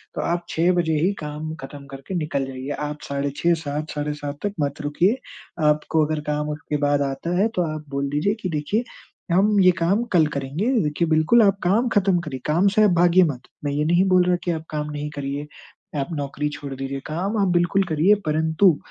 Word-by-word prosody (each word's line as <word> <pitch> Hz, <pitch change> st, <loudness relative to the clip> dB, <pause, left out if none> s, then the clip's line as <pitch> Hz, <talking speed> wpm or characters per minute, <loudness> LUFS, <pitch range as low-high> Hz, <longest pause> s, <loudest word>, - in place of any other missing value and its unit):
तो -, -, -2 dB
आप 175 Hz, 0 st, -1 dB
6 170 Hz, +3 st, +2 dB
बजे 170 Hz, -2 st, +1 dB
ही 180 Hz, +6 st, +2 dB
काम 150 Hz, +1 st, -5 dB
खत्म 140 Hz, +1 st, -9 dB
करके 135 Hz, +7 st, -7 dB
निकल 150 Hz, -5 st, -1 dB
जाइए। 130 Hz, +1 st, -7 dB, 0.2 s
आप 150 Hz, 0 st, -7 dB
साढ़े 140 Hz, 0 st, -1 dB
6, 170 Hz, 0 st, +3 dB
7, 155 Hz, -1 st, -4 dB
साढ़े 150 Hz, 0 st, -2 dB
7 145 Hz, -1 st, -6 dB
तक 205 Hz, -, -1 dB
मत 145 Hz, +1 st, -2 dB
रुकिए, 175 Hz, -, +1 dB, 0.5 s
आपको 150 Hz, +1 st, +2 dB
अगर 155 Hz, 0 st, -2 dB
काम 150 Hz, 0 st, -1 dB
उसके 150 Hz, 0 st, -3 dB
बाद 145 Hz, 0 st, +1 dB
आता 140 Hz, +6 st, -2 dB
है 200 Hz, +4 st, +4 dB
तो 180 Hz, -, +2 dB
आप 155 Hz, 0 st, -7 dB
बोल 140 Hz, 0 st, -2 dB
दीजिए 150 Hz, +8 st, +1 dB
कि, 185 Hz, -, -2 dB
"देखिए, 160 Hz, +9 st, -1 dB, 0.5 s
हम 200 Hz, +3 st, +4 dB
ये 185 Hz, -1 st, +7 dB
काम 195 Hz, +7 st, +2 dB
कल 165 Hz, -3 st, +5 dB
करेंगे।" 145 Hz, -, -1 dB
देखिए, 150 Hz, +3 st, 0 dB
बिल्कुल 160 Hz, +9 st, +4 dB
आप 200 Hz, -1 st, +3 dB
काम 210 Hz, +8 st, +2 dB
खत्म 190 Hz, -3 st, +3 dB
करिए, 150 Hz, -6 st, -6 dB
काम 170 Hz, +6 st, +3 dB
से 215 Hz, -, +5 dB
आप 210 Hz, -, +5 dB
भागिये 175 Hz, +1 st, +6 dB
मत। 140 Hz, -6 st, -3 dB, 0.2 s
मैं 145 Hz, -, 0 dB
ये 150 Hz, +1 st, 0 dB
नहीं 175 Hz, +4 st, +3 dB
बोल 180 Hz, -, +6 dB
रहा 180 Hz, -, +3 dB
कि 175 Hz, -, 0 dB
आप 160 Hz, -1 st, -4 dB
काम 150 Hz, -1 st, -3 dB
नहीं 150 Hz, 0 st, -4 dB
करिए, 140 Hz, +1 st, -4 dB, 0.5 s
आप 135 Hz, -, -1 dB
नौकरी 145 Hz, 0 st, -2 dB
छोड़ 145 Hz, -1 st, -7 dB
दीजिए। 135 Hz, +1 st, -4 dB
काम 185 Hz, +8 st, -2 dB
आप 195 Hz, -, +3 dB
बिल्कुल 175 Hz, +3 st, +2 dB
करिए, 165 Hz, +7 st, +4 dB
परंतु 160 Hz, +2 st, +3 dB
155 Hz, 215 wpm, -23 LUFS, 145-180 Hz, 0.5 s, ये